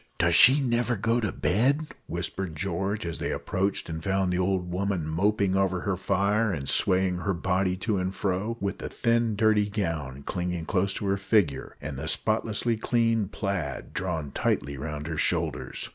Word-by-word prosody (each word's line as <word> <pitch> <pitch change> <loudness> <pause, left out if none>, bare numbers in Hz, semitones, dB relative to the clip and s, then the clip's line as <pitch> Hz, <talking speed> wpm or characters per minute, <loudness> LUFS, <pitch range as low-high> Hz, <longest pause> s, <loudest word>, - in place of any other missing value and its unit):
"Does - - +3
she 135 +4 +8
never 120 -1 +1
go 115 +4 +1
to 105 -4 -1
bed?" 135 - +1 0.2
whispered 85 0 -3
George, 95 +5 -2
as 85 0 -3
they - - -2
approached 95 +1 -1
and 80 -1 -5
found 95 -2 +1
the 90 - 0
old 90 -1 0
woman 95 -2 -1
moping 95 +4 +1
over 95 -2 +1
her 100 -1 -1
fire, 100 +4 +1
and 70 -6 -4
swaying 90 +5 +2
her 100 -1 -1
body 90 +1 0
to 110 -3 +1
and 90 0 -1
fro, 100 +4 -1
with 100 -1 -3
the - - -5
thin 115 -1 +1
dirty 105 -1 +3
gown 80 -10 -3
clinging 90 0 -3
close 95 +3 0
to - - -3
her 100 0 +1
figure, 95 -8 0
and 70 -2 -6
the 75 - -4
spotlessly 110 +4 +1
clean 115 -2 +1
plaid 95 -8 -4
drawn 80 -6 -3
tightly 70 - -1
round 75 +2 -5
her 80 -1 -4
shoulders. 65 -3 -1
95 Hz, 175 wpm, -27 LUFS, 85-105 Hz, 0.2 s, she